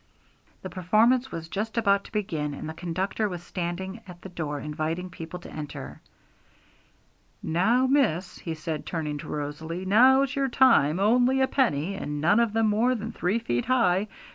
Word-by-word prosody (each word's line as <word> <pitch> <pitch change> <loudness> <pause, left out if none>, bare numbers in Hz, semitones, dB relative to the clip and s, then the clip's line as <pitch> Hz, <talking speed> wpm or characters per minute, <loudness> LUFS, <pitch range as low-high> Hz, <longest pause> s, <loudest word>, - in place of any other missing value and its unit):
The 185 - -5
performance 230 +8 +2
was 165 -1 -6
just 215 +6 -4
about 200 -3 +2
to - - -13
begin, 155 -9 -2
and - - -7
the 160 - -5
conductor 185 +5 -2
was 175 -2 -6
standing 190 +4 -5
at 180 -1 -11
the 190 - -8
door 150 -4 -4
inviting 160 +5 -3
people 165 0 -7
to - - -11
enter. 150 -2 -7 1.4
'Now, 225 +10 +2
miss,' 215 - +1
he 165 -2 -5
said, 155 -1 -5
turning 150 -3 -3
to - - -8
Rosalie, 160 +5 -5
'now's 260 +6 +5
your 275 -1 0
time; 230 - +4
only 245 +6 +3
a 265 - +4
penny, 195 - +1
and 150 -6 -4
none 170 +9 +4
of 235 -2 +2
them 225 0 +2
more 230 +5 +2
than 225 0 -5
three 180 +5 0
feet 120 - -2
high! 215 -6 +2
185 Hz, 170 wpm, -26 LUFS, 160-230 Hz, 1.4 s, now's